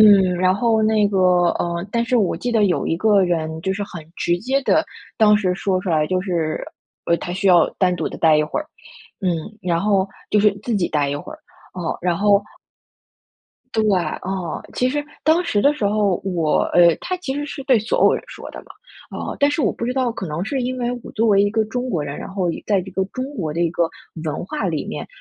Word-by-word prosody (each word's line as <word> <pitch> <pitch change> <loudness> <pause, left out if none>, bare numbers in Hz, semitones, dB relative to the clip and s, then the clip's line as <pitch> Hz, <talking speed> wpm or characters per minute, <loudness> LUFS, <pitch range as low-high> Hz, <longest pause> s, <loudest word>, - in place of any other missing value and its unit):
嗯， 195 -4 +6
然 185 +1 +3
后 220 +1 +2
那 215 -1 +3
个 195 -2 0 0.4
呃， 170 +2 -2
但 235 - +1
是 245 +2 +1
我 205 -6 +2
记 245 - -3
得 220 -2 +3
有 175 -7 0
一 165 - 0
个 205 +1 +4
人， 160 -2 -2
就 190 - -1
是 205 - -3
很 175 -4 -9
直 175 0 0
接 265 +8 0
地 - - +3 0.4
当 210 -2 +6
时 185 -3 0
说 190 0 0
出 185 - -2
来 155 -2 +2
就 185 +3 0
是 165 -5 -2 0.4
呃， 170 - +3
他 175 - -5
需 195 +1 +1
要 175 -2 +6
单 180 -2 +3
独 - - -2
地 - - -8
待 160 -2 +5
一 - - +3
会 150 - -3
儿， 305 - -8 0.5
嗯， 190 - 0 0.3
然 175 -2 0
后 195 -1 +2 0.2
就 210 - +4
是 210 0 +5
自 235 - -2
己 180 -3 0
待 150 -2 +1
一 - - -2
会 295 - -8
儿， - - -17 0.4
哦， 175 -3 -3
然 175 -1 0
后 205 +1 +4 1.3
对， 220 - +2 0.2
啊， - - -3 0.5
其 250 - +1
实 290 +2 -1 0.2
当 320 +3 +3
时 210 - 0
的 285 - +5
时 220 -9 -2
候， 205 -3 +1
我 170 -5 +1
呃， 170 -2 +6
他 370 - -2
其 320 -7 -4
实 290 - -3
是 275 -1 -7
对 260 -4 +5
所 220 +1 0
有 - - +5
人 - - -3
说 - - -9
的 - - -8
嘛， - - -22 0.5
啊， - - -4
但 285 0 +4
是 295 +1 -1
我 - - +2
不 235 - -5
知 250 - -1
道， 255 -3 0
可 195 - -6
能 155 +3 -3
是 265 +5 -2
因 255 +1 -2
为 240 0 -1
我 - - -9
作 225 +1 +1
为 200 -2 +5
一 205 - +1
个 220 0 +2
中 245 +3 -3
国 170 -9 -1
人， 145 0 -5
然 - - -7
后 185 -3 0 0.2
在 205 -2 +2
一 185 +1 -7
个 190 +1 0
中 255 - -3
国 160 -7 -3
的 170 - -1
一 170 - +2
个 170 0 0 0.4
文 155 - -3
化 295 +9 -3
里 - - -2
面， - - -5
200 Hz, 260 characters per minute, -21 LUFS, 175-230 Hz, 1.3 s, 嗯